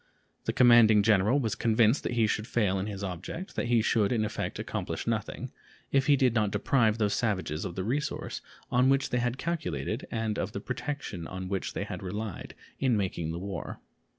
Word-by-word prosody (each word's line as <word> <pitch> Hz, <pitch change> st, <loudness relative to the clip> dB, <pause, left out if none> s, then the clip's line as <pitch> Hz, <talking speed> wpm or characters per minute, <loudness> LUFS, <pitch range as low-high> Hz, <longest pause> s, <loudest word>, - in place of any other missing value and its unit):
The -, -, +1 dB
commanding 120 Hz, -4 st, +6 dB
general 105 Hz, +5 st, +4 dB
was 115 Hz, -6 st, -1 dB
convinced 115 Hz, +2 st, +3 dB
that -, -, -3 dB
he 115 Hz, -2 st, +3 dB
should 105 Hz, +1 st, -1 dB
fail 100 Hz, -5 st, +1 dB
in 95 Hz, -, -3 dB
his 100 Hz, -2 st, -5 dB
object, 95 Hz, -, -6 dB
that -, -, -1 dB
he 120 Hz, -2 st, +3 dB
should 105 Hz, -3 st, +2 dB
in 110 Hz, -3 st, +1 dB
effect -, -, -3 dB
accomplish -, -, -4 dB
nothing, -, -, -3 dB, 0.4 s
if 135 Hz, +1 st, +2 dB
he 145 Hz, -, +6 dB
did 130 Hz, -3 st, +3 dB
not 110 Hz, -3 st, +2 dB
deprive 110 Hz, +2 st, +2 dB
those 105 Hz, -2 st, +1 dB
savages 95 Hz, -8 st, -1 dB
of 85 Hz, -, -5 dB
the 95 Hz, -, -2 dB
resource 135 Hz, +8 st, -2 dB, 0.3 s
on 125 Hz, +2 st, +4 dB
which 135 Hz, 0 st, +2 dB
they 125 Hz, -, +1 dB
had 120 Hz, +1 st, -1 dB
calculated 155 Hz, -7 st, -3 dB
and 110 Hz, -2 st, -2 dB
of -, -, -3 dB
the -, -, -3 dB
protection 130 Hz, -, -5 dB
on 95 Hz, 0 st, -6 dB
which 95 Hz, -2 st, -2 dB
they -, -, -2 dB
had -, -, -6 dB
relied 105 Hz, +1 st, -5 dB, 0.2 s
in 125 Hz, -4 st, +2 dB
making 90 Hz, -5 st, -2 dB
the 85 Hz, -, -4 dB
war. 95 Hz, 0 st, -5 dB
110 Hz, 200 wpm, -29 LUFS, 100-125 Hz, 0.4 s, commanding